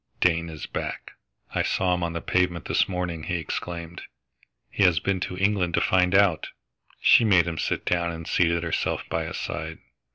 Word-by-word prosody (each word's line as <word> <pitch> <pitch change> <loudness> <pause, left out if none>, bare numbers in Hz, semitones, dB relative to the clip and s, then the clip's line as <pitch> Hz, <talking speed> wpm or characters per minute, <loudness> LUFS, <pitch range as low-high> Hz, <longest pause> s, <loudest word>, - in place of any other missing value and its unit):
"Dane 85 -1 +2
is 80 -1 -7
back - - -5 0.4
I - - +1
saw 90 -1 +1
him 90 - -1
on 85 -1 -2
the 85 - -4
pavement 90 -3 0
this - - +1
morning!" 90 -3 -3
he 90 - -2
exclaimed. 85 +1 -5 0.7
"He - - -3
has 90 -4 +5
been 95 +2 -1
to 90 +1 -4
England 95 -3 +1
to - - +3
find 90 0 +3
out!" 95 -5 +3 0.5
She - - +6
made 95 -6 +5
him 85 -2 -4
sit - - -2
down 85 -1 0
and 80 -1 -7
seated 85 -1 +2
herself 85 - -1
by 80 0 -1
his - - -5
side. 80 +1 -5
85 Hz, 190 wpm, -25 LUFS, 85-90 Hz, 0.7 s, She